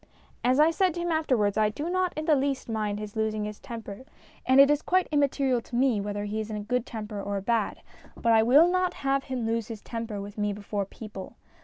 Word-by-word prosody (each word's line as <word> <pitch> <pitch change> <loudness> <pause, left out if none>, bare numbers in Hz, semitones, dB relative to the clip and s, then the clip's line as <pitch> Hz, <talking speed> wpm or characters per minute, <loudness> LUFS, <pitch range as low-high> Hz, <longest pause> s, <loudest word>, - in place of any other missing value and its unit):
As 255 +3 +3
I 310 +2 +6
said 365 0 +1
to - - -4
him 345 0 -1
afterwards, 235 -10 +1
I 215 -1 +3
do 290 +9 -5
not 370 0 0
in 310 - -2
the 315 - +4
least 275 -1 -1
mind 215 -2 -2
his 210 0 -7
losing 215 -1 -1
his 210 0 -7
temper, 225 -3 -8 0.4
and 260 +1 +5
it 280 +1 +8
is 295 0 +2
quite 370 0 +1
im 295 - +3
material 270 -3 +1
to 235 - -9
me 245 -4 +2
whether 205 0 -3
he 210 +1 -3
is 220 0 -4
in 215 - -4
a 205 - -5
good 250 +3 -1
temper 210 -2 -5
or 200 0 -3
a - - -3
bad, 225 -1 -1 0.3
but 230 - +1
I 220 - +6
will 275 +9 +6
not 365 0 +1
have 275 0 +1
him 255 -3 -3
lose 225 -1 -1
his 220 -3 -8
temper 225 -3 -5
with 205 +1 -8
me 205 0 0
before 200 0 -3
people. 205 -3 -9
230 Hz, 250 wpm, -27 LUFS, 210-275 Hz, 0.4 s, it